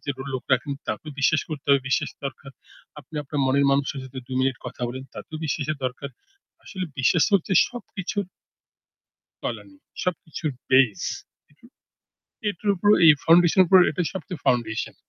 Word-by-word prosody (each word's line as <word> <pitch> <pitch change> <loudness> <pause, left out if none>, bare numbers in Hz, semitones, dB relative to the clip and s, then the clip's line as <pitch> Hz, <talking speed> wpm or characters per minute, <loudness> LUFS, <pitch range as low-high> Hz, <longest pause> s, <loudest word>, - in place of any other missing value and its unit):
যে - - 0 0.2
লোক 130 - -4
রাখেন, 135 +3 +1 0.2
তাকেও 150 +8 -4
বিশ্বাস 155 +2 +3
করতে 150 -3 -7
হবে। 140 -1 +5
বিশ্বাস - - 0
দরকার। 135 0 -6 0.5
আপনি 155 - -18
আপনার 145 +1 -5
মনের 140 +1 +3
মানুষের 140 0 0
সাথে 130 0 -9
২ 130 - -4
মিনিট 130 -1 +1
কথা 125 0 -8
বলেন, 130 +2 -6
তাতেও 160 - -8
বিশ্বাসের 150 0 -2
দরকার। 135 +2 -6 0.6
আসলে 185 -3 -5
বিশ্বাস 150 +4 +4
হচ্ছে 190 0 +1 0.2
সবকিছুর 205 -4 -5 1.2
তলানি, 295 - -5 0.3
সবকিছুর 160 -3 -3 0.2
base 130 -8 +4 0.4
উহু। 145 +11 -23 0.8
এটার 205 +1 -4
উপর 205 +3 +2 0.2
এই 155 - +10
foundation 175 +2 +5
এর - - +1
উপর 190 +2 +7
এটাই 165 +2 -2
সবচেয়ে 185 -4 -7
foundation. 115 -3 0
145 Hz, 150 wpm, -24 LUFS, 135-175 Hz, 1.2 s, এই